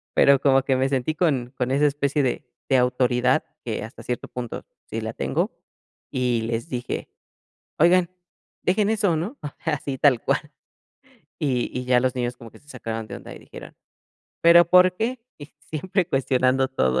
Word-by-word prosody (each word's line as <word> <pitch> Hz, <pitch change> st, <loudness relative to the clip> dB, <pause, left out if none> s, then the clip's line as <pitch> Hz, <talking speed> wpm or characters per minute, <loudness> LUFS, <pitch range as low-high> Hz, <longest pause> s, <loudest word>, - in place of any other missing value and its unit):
pero 140 Hz, -1 st, +6 dB
como 135 Hz, -1 st, +3 dB
que 135 Hz, 0 st, +1 dB
me 130 Hz, +1 st, +2 dB
sentí 135 Hz, +2 st, 0 dB
con 135 Hz, -7 st, 0 dB
con 125 Hz, +1 st, -1 dB
esa 145 Hz, +2 st, +3 dB
especie 140 Hz, 0 st, 0 dB
de 130 Hz, +2 st, -1 dB, 0.2 s
de 135 Hz, -, +4 dB
autoridad, 125 Hz, +2 st, +2 dB, 0.2 s
que 110 Hz, -3 st, -3 dB
hasta 115 Hz, +1 st, -10 dB
cierto 125 Hz, +1 st, -4 dB
punto 120 Hz, -2 st, -6 dB, 0.3 s
sí -, -, -3 dB
la -, -, -4 dB
tengo, -, -, -1 dB, 0.6 s
y 125 Hz, -2 st, 0 dB
les 115 Hz, 0 st, -3 dB
dije: 125 Hz, -1 st, -4 dB, 0.7 s
"Oigan, 175 Hz, +2 st, +4 dB, 0.5 s
dejen 200 Hz, +3 st, +2 dB
eso, 205 Hz, -6 st, +2 dB
¿no?". 205 Hz, -, -4 dB
O 150 Hz, -, -3 dB, 0.2 s
sea, 160 Hz, -3 st, 0 dB
así 140 Hz, -1 st, -5 dB
tal 130 Hz, -4 st, +4 dB
cual, -, -, +2 dB, 1.0 s
y 130 Hz, -6 st, 0 dB
y 125 Hz, -, -4 dB
ya 125 Hz, -1 st, +4 dB
los 130 Hz, 0 st, 0 dB
niños 120 Hz, -1 st, -2 dB
como 115 Hz, -2 st, -12 dB
que -, -, -17 dB
se 145 Hz, -, -28 dB
sacaron 115 Hz, -4 st, -5 dB
de -, -, -6 dB
onda -, -, -10 dB
y -, -, -11 dB
dijeron: -, -, -12 dB, 0.7 s
"Pero, 170 Hz, +1 st, +8 dB
¿por 180 Hz, +1 st, +5 dB
qué?". 240 Hz, +2 st, -2 dB, 0.2 s
Y 145 Hz, 0 st, -11 dB
siempre 170 Hz, +6 st, -2 dB
cuestionando 130 Hz, -1 st, +2 dB
todo. 65 Hz, -, +1 dB
135 Hz, 180 wpm, -24 LUFS, 125-155 Hz, 1.0 s, Pero